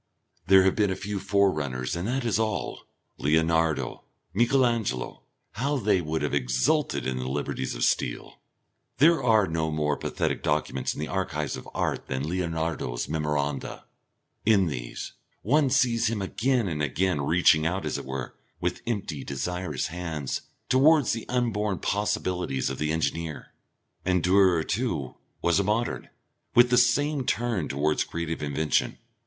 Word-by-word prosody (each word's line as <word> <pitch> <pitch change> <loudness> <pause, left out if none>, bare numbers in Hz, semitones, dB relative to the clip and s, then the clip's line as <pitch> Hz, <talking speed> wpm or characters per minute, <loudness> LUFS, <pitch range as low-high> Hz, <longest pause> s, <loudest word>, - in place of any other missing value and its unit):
There 95 0 +7
have 95 - +3
been 105 -2 +2
a 95 - -1
few 105 0 -4
forerunners 85 -11 0
and 85 +4 -3
that 130 +1 -1
is 110 -2 +1
all. 110 -1 -2 0.3
Leonardo, 80 +2 +1 0.3
Michael 120 +5 +3
Angelo; 110 - -2 0.3
how 140 +6 -1
they 105 -6 +2
would 80 -1 -2
have 75 - -1
exulted 65 - +1
in 65 -1 -1
the 65 0 -3
liberties 65 -2 -3
of - - -2
steel! - - -1 0.6
There 165 +3 +5
are 110 -5 +4
no 80 -2 -1
more 75 -1 0
pathetic - - -2
documents - - -1
in - - -8
the 75 - -2
archives 80 -6 -2
of - - -9
art - - -1
than 65 +2 -2
Leonardo's 80 -7 -2
memoranda. 75 -2 -2 0.6
In 105 -3 +4
these, 60 -7 -5 0.3
one 140 +4 +3
sees 125 -4 +2
him 115 -2 -2
again 115 +4 0
and 75 -4 -2
again 75 +3 0
reaching 80 +1 +4
out 95 +3 -2
as - - -2
it - - -8
were, 65 -1 -5 0.3
with - - -2
empty 100 - -3
desirous 80 0 -3
hands, 80 -6 -3 0.3
towards 145 +2 +4
the 115 - -6
unborn 105 -5 0
possibilities 90 -11 -1
of 65 - -6
the 75 0 0
engineer. 80 -1 -3 0.5
And 90 -1 +1
Durer, 90 -3 +4
too, 85 - -2 0.3
was 85 +2 +3
a - - +2
Modern, 110 +4 -1 0.5
with 120 0 +6
the 125 - +5
same 140 +4 +2
turn 115 -8 -1
towards 75 +2 +1
creative 85 -1 -4
invention. 75 0 0
90 Hz, 150 wpm, -26 LUFS, 75-110 Hz, 0.6 s, There